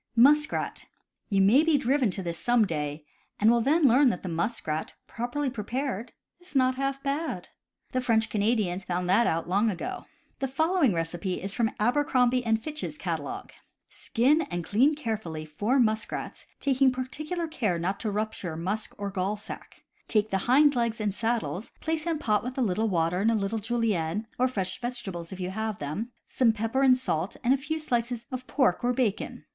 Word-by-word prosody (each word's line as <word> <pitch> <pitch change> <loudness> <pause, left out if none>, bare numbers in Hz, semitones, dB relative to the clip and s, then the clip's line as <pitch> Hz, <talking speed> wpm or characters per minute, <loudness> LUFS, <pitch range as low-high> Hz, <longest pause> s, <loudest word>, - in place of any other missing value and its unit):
Muskrat. 295 +6 +3 0.2
— - - -43
You 195 -1 +3
may 225 +10 +6
be 325 -2 +4
driven 265 -2 +2
to 190 +1 -4
this, 170 -1 -3
some 240 -2 +3
day, 150 -3 -3 0.3
and 215 +2 +5
will 235 0 +3
then 300 +7 +3
learn 260 +3 +6
that 190 -3 -3
muskrat, 165 -2 -2
properly 245 +5 -3
prepared, 240 0 -3 0.3
is 355 -4 -15
not 260 -1 +4
half 275 +1 -2
bad. 290 +4 -2 0.4
The 255 - 0
French 225 -3 +2
Canadians 210 -3 0
found 180 0 -2
that 205 +6 +4
out 165 +1 0
long 200 +5 +2
ago. 185 -5 -4 0.3
The 270 - 0
following 315 - +2
recipe 170 +3 -2
is 195 +1 -4
from 225 0 +1
Aber 245 +7 +3
crombie 255 -2 +2 0.2
& - - -15
Fitch's 305 0 -4
catalogue: - - -4 0.4
"Skin 275 +7 +2
and 175 0 -3
clean 260 - +3
carefully 215 - -4
four 205 - 0
muskrats, 220 -2 -1 0.2
being 270 -1 +4
par 255 0 -2
ticular 305 - -2
not 190 +4 -2
to 220 - -2
rupture 205 -5 -3
musk 200 +6 -3
or 200 -1 -4
gall 195 +2 -1
sac. 210 - -10 0.2
Take 215 0 +1
the 195 +2 -1
hind 285 +2 +6
legs 235 -2 0
and 210 -2 0
saddles, 225 -2 -2
place 320 +1 -2
in 330 -2 +1
pot 215 -8 +1
with 250 +2 -5
a - - +1
httle 220 0 +1
water, 175 0 +1
a - - 0
little 215 +1 -1
julienne 215 -4 -1
(or 255 - +4
fresh 195 -4 -3
vegetables, 195 -9 -4
if 190 - -7
you 180 0 -3
have 220 0 -3
them), 155 - -4 0.2
some 245 -3 +3
pepper 225 +4 -1
and 260 -2 +6
salt, 185 -8 -2
and 250 - +4
a - - +2
few 305 +4 -3
slices 240 -5 -1
of 255 0 -5
pork 250 - +2
or 245 +1 +2
bacon. 235 -5 -2
225 Hz, 185 wpm, -27 LUFS, 195-260 Hz, 0.4 s, may